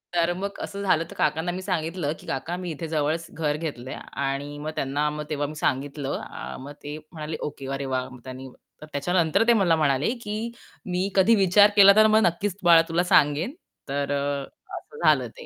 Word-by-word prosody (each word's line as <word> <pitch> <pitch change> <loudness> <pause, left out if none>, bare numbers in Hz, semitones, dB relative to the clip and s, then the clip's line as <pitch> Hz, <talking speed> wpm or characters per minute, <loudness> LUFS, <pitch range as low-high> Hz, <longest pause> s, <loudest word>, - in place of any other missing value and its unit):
तर 170 0 +3
मग 200 +2 -5
असं 200 0 -5
झालं. 165 -4 +2
तर - - -10
काकांना 160 +4 0
मी 185 +1 -5
सांगितलं, 165 -4 -2
की - - -15
"काका, 160 +6 -3
मी 180 -2 -5
इथे 160 +2 -5
जवळच 155 +1 -1
घर 150 -2 -1
घेतलं 135 -6 -5
आहे." - - -6 0.2
आणि 140 +2 -3
मग 155 +1 -4
त्यांना 145 +2 0
मग 150 0 -5
तेव्हा 145 -1 -1
मी 155 - -8
सांगितलं 140 0 -2
अ, 65 +2 -7
मग 140 +2 -8
ते 145 +1 -5
म्हणाले, 155 -1 -5
"ओके. 140 -2 -5
अरे 135 0 -3
वाह!" 130 -1 -2
मग 125 -1 -12
त्यांनी 130 0 -8 0.3
तर - - -8
त्याच्यानंतर 170 +6 +2
ते 235 - +7
मला 185 -7 +3
म्हणाले, 140 0 +2
की 210 0 -4 0.5
"मी 185 +2 -1
कधी 200 +4 +5
विचार 205 +1 +6
केला, 200 -1 +9
तर 215 0 +7
मग 220 - +7
नक्कीच 190 +3 0
बाळा 170 -1 +7
तुला 170 +2 +2
सांगेन." 155 - +3 0.4
तर 140 0 -1
अ, 140 0 -1 0.3
असं 455 - -12
झालं - - +4
ते. 485 - -10
155 Hz, 205 wpm, -25 LUFS, 145-180 Hz, 0.5 s, केला